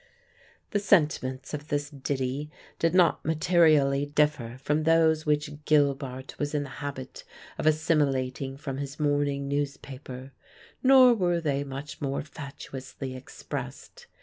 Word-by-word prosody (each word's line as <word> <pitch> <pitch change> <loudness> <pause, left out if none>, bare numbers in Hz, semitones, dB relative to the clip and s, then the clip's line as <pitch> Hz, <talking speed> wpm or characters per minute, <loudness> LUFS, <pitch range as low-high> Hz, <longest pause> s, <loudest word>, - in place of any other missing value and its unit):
The 205 - +1
sentiments 150 -9 +1
of 150 0 -5
this 145 0 -2
ditty 140 +1 -3 0.3
did 165 +1 +1
not 180 -2 +4
materially 155 -4 +3
differ 145 -5 0
from 150 +3 0
those 160 -1 +3
which 150 0 -1
Gilbart 135 -3 0
was 145 +1 -2
in 145 - +1
the 140 - -8
habit 135 -2 -6 0.4
of - - 0
assimilating 140 -4 +1
from 135 -2 -5
his 140 +1 -6
morning 145 -1 0
newspaper; 140 -2 -5 0.5
nor 260 -2 +7
were 175 -5 +1
they 140 -3 -1
much 140 +1 -7
more 140 -1 -2
fatuously 135 -2 -8
expressed. 480 - -8
145 Hz, 125 wpm, -27 LUFS, 135-155 Hz, 0.5 s, nor